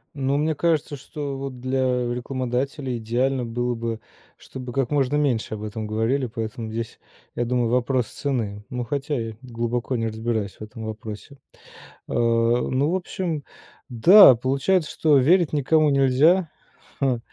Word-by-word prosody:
Ну, 140 0 0
мне 155 +1 0
кажется, 155 -2 0
что 140 0 -6
вот 135 -2 -6
для 130 +1 -1 0.3
рекламодателей 130 +1 -3
идеально 125 +3 -1
было 120 +1 -2
бы, 115 -1 -4 0.4
чтобы 125 -2 -9
как 135 -3 0
можно 145 -1 +1
меньше 135 -8 0
об 105 -1 -6
этом 110 +1 -5
говорили, 115 +6 0
поэтому 110 -1 -5
здесь, 115 0 -5 0.4
я 120 - -1
думаю, 120 -1 0
вопрос 125 0 +1
цены, 110 -8 -3
но, 125 -1 -3
хотя 140 +4 -2
я 115 -1 -5
глубоко 120 0 -3
не 115 -1 -1
разбираюсь 110 -2 -3
в - - -7
этом 110 +1 -8
вопросе. 110 +5 -8 0.7
А, - - -6
ну, 120 +4 +2
в 185 - +1
общем, 175 -5 -3 0.5
да, 135 - +8
получается, 140 +8 0
что 150 -3 +3
верить 165 +6 +3
никому 155 +1 +3
нельзя, 145 +6 +3 0.5
ха, 130 -4 +1
125 Hz, 150 wpm, -23 LUFS, 115-140 Hz, 0.7 s, да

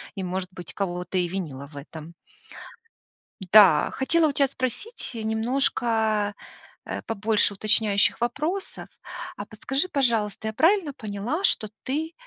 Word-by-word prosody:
и 190 - -4
может 185 0 -3
быть 175 -2 -8
кого-то 180 -1 -2
и 180 - +2
винила 160 -7 -5
в 150 - -17
этом. 155 +3 -9 1.3
Да. 190 -4 +6
Хотела 315 +4 +2
у - - -1
тебя 275 -1 +3
спросить 260 - -4
немножко, 220 -2 0 0.5
э, - - -4
побольше 215 -1 +1
уточняющих 210 +1 +2
вопросов. 305 +11 -2 0.5
А 205 - -5
подскажи, 270 - -2
пожалуйста, 225 - 0
я 220 - -3
правильно 330 - +3
поняла, 225 - -4
что 215 - +2
ты 315 +5 -2
220 Hz, 125 wpm, -25 LUFS, 195-270 Hz, 1.3 s, Да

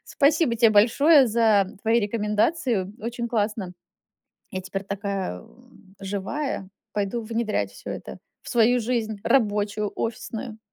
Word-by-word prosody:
Спасибо 285 -3 +2
те 225 -1 +5
большое 265 +8 +6
за 220 -3 +3 0.2
твои 230 +2 +3
рекомендацию. 210 - 0
Очень 235 +2 -4
классно. 210 -4 -1 0.8
Я 185 -4 -4
теперь 195 +1 -5
такая, 195 - -3
э, - - -16 0.6
живая. 195 +3 -3 0.2
Пойду 210 +3 -2
внедрять 215 - -2
всё 100 - -9
это - - -7 0.2
в - - -11
свою 240 +1 +4
жизнь, 220 -2 -2
рабочую, 210 -4 +1
офисную. 225 0 -5
220 Hz, 125 wpm, -24 LUFS, 200-235 Hz, 0.8 s, большое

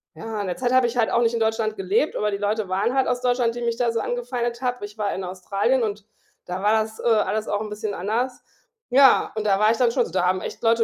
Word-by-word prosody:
ja, 220 -2 -5
in 200 - -3
der 180 - -3
Zeit 250 -1 0
habe 255 -1 +5
ich 235 +1 -5
halt 225 -2 +2
auch 235 - +2
nicht 230 0 +2
in - - -1
Deutschland 220 -1 0
gelebt, 195 +10 0
aber 210 0 0
die 200 - -2
Leute 210 +1 -1
waren 200 +6 0
halt 265 -1 +2
aus 245 - -1
Deutschland, 245 -2 +1
die 240 - -5
mich 235 -1 -1
da 240 -1 +1
so 230 - 0
angefeindet 240 0 -3
hat. 250 -3 -2
Ich 205 +1 -8
war 210 -2 -1
in 190 - -4
Australien 195 +7 0
und 210 -2 -3 0.4
da 180 +1 -5
war 210 +1 +4
das, 220 0 -11
äh, - - -8
alles 215 -1 +1
auch 205 0 -1
'n 215 - -5
bisschen 210 0 -4
anders. 230 +7 -2 0.5
Ja, 265 +1 +5
und 215 - -2
da 195 -2 +3
war 215 +1 +4
ich 230 - 0
dann 245 -1 +3
schon 245 -2 +2
so - - -10
da 180 0 +1
haben 185 0 +1
echt - - -7
Leute 230 0 +4
225 Hz, 285 wpm, -23 LUFS, 205-240 Hz, 0.5 s, habe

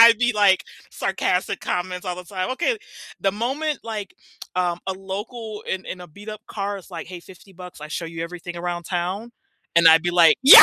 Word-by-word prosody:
I'd 230 -1 +10
be 245 0 +3
like 205 -3 +4 0.3
sarcastic - - 0
comments 180 +1 -2
all 180 - -2
the 180 - -7
time, 185 +4 -3
"Okay" 345 - +1 0.4
The 195 - +2
moment 270 +7 -1
like, 215 -3 -5 0.4
um, 175 -1 +1
a 190 - 0
local 210 +3 -6
in 190 0 -2
in 185 - -5
a 180 - -8
beat 205 +7 -13
up 215 0 -6
car 200 -1 -3
is 190 - -14
like, 170 -2 -6
"Hey, 180 -1 -8
50 190 +2 -15
bucks, 180 -3 -11
I 150 - -7
show 165 - -3
you 165 0 -5
everything 175 +1 -6
around 175 0 -3
town" 185 +7 -2 0.4
and 170 -1 +9
I'd 160 0 +8
be 175 - +1
like, 170 -2 +7
"Yeah!" 275 - +13
185 Hz, 210 wpm, -23 LUFS, 175-210 Hz, 0.4 s, Yeah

